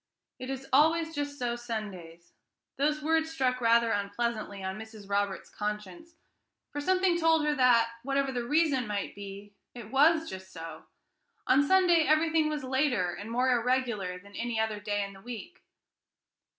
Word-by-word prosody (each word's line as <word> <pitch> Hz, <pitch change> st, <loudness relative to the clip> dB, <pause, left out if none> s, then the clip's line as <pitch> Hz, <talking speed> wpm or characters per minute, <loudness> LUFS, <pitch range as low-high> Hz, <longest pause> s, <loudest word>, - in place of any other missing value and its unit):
"It 255 Hz, -, -6 dB
is 270 Hz, 0 st, -5 dB
always 320 Hz, +3 st, +4 dB
just 290 Hz, -1 st, -3 dB
so 240 Hz, -2 st, -1 dB
Sundays." 195 Hz, -8 st, -7 dB, 0.4 s
These 300 Hz, +2 st, 0 dB
words 320 Hz, +1 st, +2 dB
struck 255 Hz, -5 st, 0 dB
rather 230 Hz, 0 st, +4 dB
unpleasantly 205 Hz, 0 st, -2 dB
on 190 Hz, +2 st, -4 dB
Mrs. 220 Hz, -2 st, -11 dB
Roberts's 200 Hz, -1 st, -2 dB
conscience, 210 Hz, -, -5 dB, 0.6 s
for 290 Hz, -, -4 dB
something 370 Hz, +1 st, +2 dB
told 320 Hz, -2 st, +3 dB
her 300 Hz, -, +2 dB
that, 250 Hz, -4 st, +4 dB
whatever 275 Hz, +1 st, 0 dB
the 245 Hz, -2 st, -2 dB
reason 285 Hz, -2 st, +2 dB
might 205 Hz, -1 st, -3 dB
be, 200 Hz, 0 st, -9 dB, 0.2 s
it 230 Hz, -3 st, -9 dB
was 315 Hz, +4 st, +4 dB
just 190 Hz, 0 st, -8 dB
so. 165 Hz, -1 st, -9 dB, 0.6 s
On 270 Hz, -, +5 dB
Sunday 345 Hz, 0 st, +4 dB
everything 315 Hz, 0 st, +3 dB
was 300 Hz, -2 st, -3 dB
later 260 Hz, -9 st, +1 dB
and 200 Hz, +5 st, -8 dB
more 250 Hz, +2 st, +2 dB
irregular 235 Hz, -6 st, 0 dB
than 200 Hz, +2 st, -15 dB
any 235 Hz, -1 st, -2 dB
other 220 Hz, -1 st, -1 dB
day 205 Hz, 0 st, -1 dB
in 200 Hz, -, -10 dB
the 195 Hz, -, -14 dB
week. 245 Hz, -, -9 dB
240 Hz, 160 wpm, -29 LUFS, 205-295 Hz, 0.6 s, On